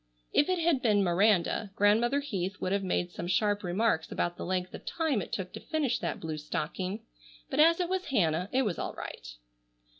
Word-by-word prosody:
If 290 - +4
it 370 - +2
had 330 -5 +2
been 210 -4 +3
Miranda, 195 +2 +2
Grandmother 230 +7 +3
Heath 200 -8 -3
would 185 - -2
have 200 0 +1
made 180 -1 -1
some 175 - -5
sharp 205 +3 +1
remarks 180 -2 0
about 175 0 -1
the - - -6
length 185 0 -2
of - - -8
time 315 -10 0
it - - -8
took 185 -2 -4
to - - -6
finish 305 -6 -1
that - - -3
blue 155 -1 -4
stocking, 180 +6 -4 0.5
but - - -1
as 330 +3 +6
it 355 - +1
was 375 +1 -1
Hannah 180 - +1
it 265 +1 +2
was 205 -7 -2
all - - -4
right. - - -8
200 Hz, 205 wpm, -30 LUFS, 180-260 Hz, 0.5 s, as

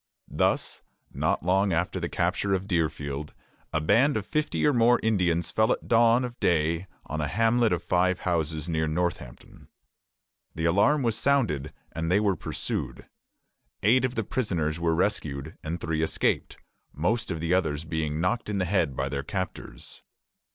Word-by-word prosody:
Thus, - - 0 0.3
not - - 0
long 95 +2 +2
after 85 +1 -1
the - - -3
capture 100 -1 0
of 95 0 -3
Deerfield, 75 -5 -2 0.4
a - - +1
band 115 - +3
of - - -4
fifty 155 -1 -1
or 150 - +4
more 120 0 +4
Indians 90 -6 +1
fell 110 0 +2
at - - -2
dawn 115 +2 +4
of 120 -1 -8
day 85 +2 +1 0.2
on 80 +1 -3
a 75 - -1
hamlet 115 +7 +2
of 90 -1 -1
five 90 +1 +1
houses 80 -3 -1
near 80 -2 0
Northampton. 80 -6 -4 0.9
The 80 0 -2
alarm 100 - +3
was 115 -2 +1
sounded, 110 - +1 0.2
and 80 +1 -3
they 95 +3 +4
were 100 -3 +2
pursued. - - -4 0.8
Eight 120 +5 +4
of 130 0 -1
the 115 - 0
prisoners 85 -10 -1
were 85 -1 +1
rescued, 80 -6 -2
and 80 +2 -4
three 80 -1 -2
escaped; 80 - 0 0.3
most 110 +10 -1
of 85 -3 -3
the 85 +2 0
others 80 -5 0
being 80 -2 -2
knocked 90 +6 -1
in 105 - -1
the 95 - 0
head 85 -7 +1
by - - -1
their 70 -1 -3
captors. 95 +5 -6
90 Hz, 165 wpm, -27 LUFS, 80-110 Hz, 0.9 s, or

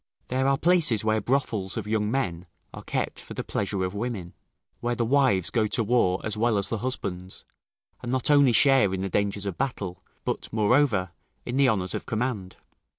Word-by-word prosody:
There 130 +1 +1
are 135 0 +3
places 160 - +3
where 110 0 +2
brothels 110 -6 -1
of 110 - -3
young 105 -1 0
men 90 -9 -2 0.3
are - - -8
kept - - -3
for - - -10
the - - -3
pleasure 100 -1 -2
of 90 +1 -2
women; 105 -5 -4 0.5
where 120 0 -1
the 115 - 0
wives 120 -8 +3
go 110 -3 +1
to 115 +2 0
war 100 -5 +2
as 110 -1 -2
well 110 0 +1
as 100 - +2
the 115 - -2
husbands, 95 -7 -5 0.6
and 120 - -4
not 130 +2 +2
only 140 -3 +6
share 130 -6 +4
in 95 - -4
the 95 - -2
dangers 100 +1 -1
of 95 -3 -4
battle, 100 -10 -3 0.2
but, - - -3
moreover, 110 - +2 0.3
in 120 - -3
the 140 -2 +5
honours 95 -5 -1
of - - -5
command. 110 -5 -3
110 Hz, 195 wpm, -26 LUFS, 95-130 Hz, 0.6 s, only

